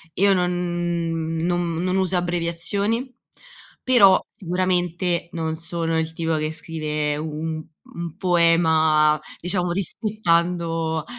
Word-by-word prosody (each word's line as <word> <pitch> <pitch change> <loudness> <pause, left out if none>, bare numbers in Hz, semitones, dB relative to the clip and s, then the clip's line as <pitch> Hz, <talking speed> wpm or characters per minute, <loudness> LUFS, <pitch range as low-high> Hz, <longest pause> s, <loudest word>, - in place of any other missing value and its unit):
io 200 +1 +4
non 175 -2 -1
non 175 0 -1
non 185 0 0
uso 185 -1 +1
abbreviazioni, 180 +8 -1 0.7
però 200 -7 +6 0.2
sicuramente 180 -1 -1
non 160 -1 -2
sono 165 0 -2
il 160 0 -2
tipo 165 0 -1
che 155 0 -1
scrive 155 -2 -3
un 155 +1 -4 0.2
un 170 -1 -7
poema, 160 -4 +4 0.2
diciamo, 180 0 -1
rispettando 170 -5 0
170 Hz, 100 wpm, -22 LUFS, 160-180 Hz, 0.7 s, però